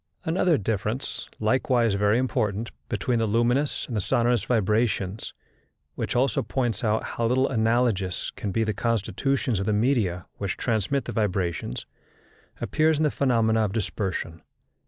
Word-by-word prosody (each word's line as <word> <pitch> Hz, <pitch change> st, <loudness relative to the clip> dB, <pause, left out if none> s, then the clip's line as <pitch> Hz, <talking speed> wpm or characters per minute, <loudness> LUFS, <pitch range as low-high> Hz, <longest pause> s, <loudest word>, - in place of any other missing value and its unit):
Another 165 Hz, 0 st, +3 dB
difference, 110 Hz, +4 st, -3 dB
likewise 120 Hz, 0 st, +2 dB
very 105 Hz, +2 st, +3 dB
important, 110 Hz, -3 st, -1 dB, 0.2 s
between 120 Hz, -2 st, 0 dB
the 115 Hz, -, +1 dB
luminous 120 Hz, +6 st, +1 dB
and 120 Hz, -, -5 dB
the 105 Hz, -, +1 dB
sonorous 120 Hz, +1 st, +2 dB
vibrations, 105 Hz, -2 st, 0 dB, 0.6 s
which -, -, -3 dB
also 125 Hz, -2 st, +2 dB
points 120 Hz, +2 st, -2 dB
out 110 Hz, -1 st, +1 dB
how 115 Hz, -, -1 dB
little 130 Hz, +3 st, +3 dB
analogous 110 Hz, -6 st, +1 dB
can 100 Hz, -, -4 dB
be 115 Hz, +3 st, +1 dB
the 110 Hz, -1 st, 0 dB
constitutions 115 Hz, +3 st, 0 dB
of 100 Hz, -, -2 dB
the 110 Hz, -, +2 dB
media 105 Hz, -6 st, +1 dB
which 100 Hz, -2 st, -3 dB
transmit 120 Hz, +4 st, 0 dB
the -, -, -4 dB
vibrations, 95 Hz, -, -1 dB, 0.7 s
appears 155 Hz, 0 st, +2 dB
in 155 Hz, -, +1 dB
the 150 Hz, -, +2 dB
phenomena 115 Hz, -4 st, +2 dB
of 100 Hz, -2 st, -1 dB
dispersion. 95 Hz, -6 st, -3 dB
115 Hz, 145 wpm, -26 LUFS, 105-125 Hz, 0.7 s, Another